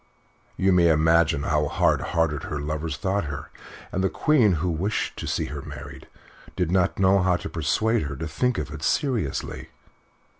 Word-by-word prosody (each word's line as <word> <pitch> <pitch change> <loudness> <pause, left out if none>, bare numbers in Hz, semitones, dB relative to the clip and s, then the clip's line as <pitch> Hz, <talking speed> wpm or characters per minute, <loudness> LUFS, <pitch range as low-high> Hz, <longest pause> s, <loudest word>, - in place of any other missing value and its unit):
You 95 +1 +3
may 90 -2 +5
imagine 80 -1 +3
how 75 0 +1
hard - - +2
hearted 80 -3 0
her 75 - -4
lovers 75 +2 -3
thought 100 -1 -1
her; 70 -2 -6 0.4
and 95 - -1
the 95 - +2
Queen, 130 - +3
who 85 +2 -1
wished 95 +7 -2
to - - -5
see - - -1
her 70 - -5
married, 70 -2 -10 0.5
did 90 -2 -1
not 90 0 +2
know 95 0 +4
how 90 -1 +3
to - - -6
persuade 110 +9 +1
her 70 -1 -4
to 80 +4 -5
think 125 +10 0
of 75 0 -4
it 75 -1 -7
seriously. 110 - -1
80 Hz, 180 wpm, -25 LUFS, 75-95 Hz, 0.5 s, may